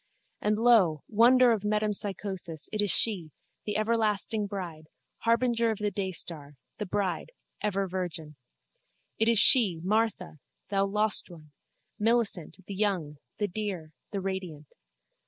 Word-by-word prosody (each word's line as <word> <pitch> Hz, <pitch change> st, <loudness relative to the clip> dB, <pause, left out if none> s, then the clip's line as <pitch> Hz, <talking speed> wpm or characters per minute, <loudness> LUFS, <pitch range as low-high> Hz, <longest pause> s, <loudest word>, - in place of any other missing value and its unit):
And 210 Hz, 0 st, 0 dB
lo, 215 Hz, -, +3 dB
wonder 245 Hz, +3 st, +5 dB
of 220 Hz, -3 st, 0 dB
metempsychosis, 200 Hz, -5 st, -3 dB
it 215 Hz, -, +1 dB
is 205 Hz, -, 0 dB
she, 180 Hz, -3 st, +4 dB, 0.4 s
the 210 Hz, -1 st, -2 dB
everlasting 215 Hz, -1 st, 0 dB
bride, 175 Hz, -6 st, -7 dB, 0.3 s
harbinger 235 Hz, 0 st, +1 dB
of 220 Hz, -, -2 dB
the 210 Hz, 0 st, -2 dB
daystar, 170 Hz, -7 st, -5 dB, 0.2 s
the 210 Hz, -, -4 dB
bride, 195 Hz, -, -3 dB, 0.3 s
ever 195 Hz, -2 st, -1 dB
virgin. 175 Hz, -4 st, -5 dB, 0.8 s
It 225 Hz, +1 st, +3 dB
is 230 Hz, -, +3 dB
she, 205 Hz, -, +7 dB
Martha, 205 Hz, -5 st, -1 dB, 0.3 s
thou 195 Hz, -1 st, +1 dB
lost 210 Hz, +1 st, +2 dB
one, 155 Hz, -4 st, -15 dB, 0.5 s
Millicent, 210 Hz, -6 st, -1 dB
the 200 Hz, -, -7 dB
young, 185 Hz, -8 st, -2 dB, 0.2 s
the 205 Hz, -, -1 dB
dear, 185 Hz, -5 st, -5 dB, 0.2 s
the 200 Hz, -2 st, -4 dB
radiant. 185 Hz, -6 st, -6 dB
200 Hz, 130 wpm, -28 LUFS, 175-215 Hz, 0.8 s, she